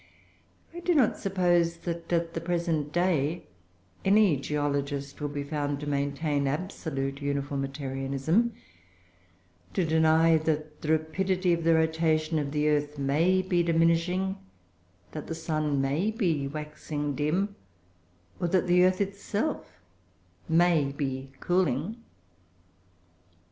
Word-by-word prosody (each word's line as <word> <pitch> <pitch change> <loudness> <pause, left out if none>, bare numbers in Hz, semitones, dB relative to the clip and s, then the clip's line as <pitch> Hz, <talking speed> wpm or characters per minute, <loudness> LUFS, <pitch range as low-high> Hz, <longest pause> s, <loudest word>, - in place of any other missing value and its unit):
I 345 - -6
do 350 0 +1
not 255 -7 +3
suppose 175 -3 +2
that, 170 -1 -4
at 170 -1 0
the 165 - -3
present 165 -3 -1
day, 170 -2 0 0.6
any 200 -4 +5
geologist 140 0 -2
would 145 -1 -2
be 145 - -2
found 145 -1 -2
to 145 - -6
maintain 140 0 0
absolute 140 -3 -3
Uniformitarianism, 140 - -1 1.2
to 185 - +2
deny 160 +1 +4
that 155 -1 -2
the 155 - -4
rapidity 180 +3 +1
of 170 -1 -1
the 165 0 +4
rotation 160 0 +1
of 140 -1 -3
the 150 0 +1
earth 150 0 0
may 160 +7 +2
be 180 -2 +1
diminishing, 170 +3 +1 0.7
that - - -7
the 165 - -4
sun 155 -3 -1
may 145 +9 +1
be 175 - 0
waxing 150 0 -4
dim, 175 +9 0 0.8
or 175 - 0
that 185 0 +2
the 180 0 +4
earth 185 +1 +3
itself 200 - -3 0.7
may 165 -4 +3
be 135 -2 -4
cooling. 175 - 0
160 Hz, 120 wpm, -28 LUFS, 145-175 Hz, 1.2 s, any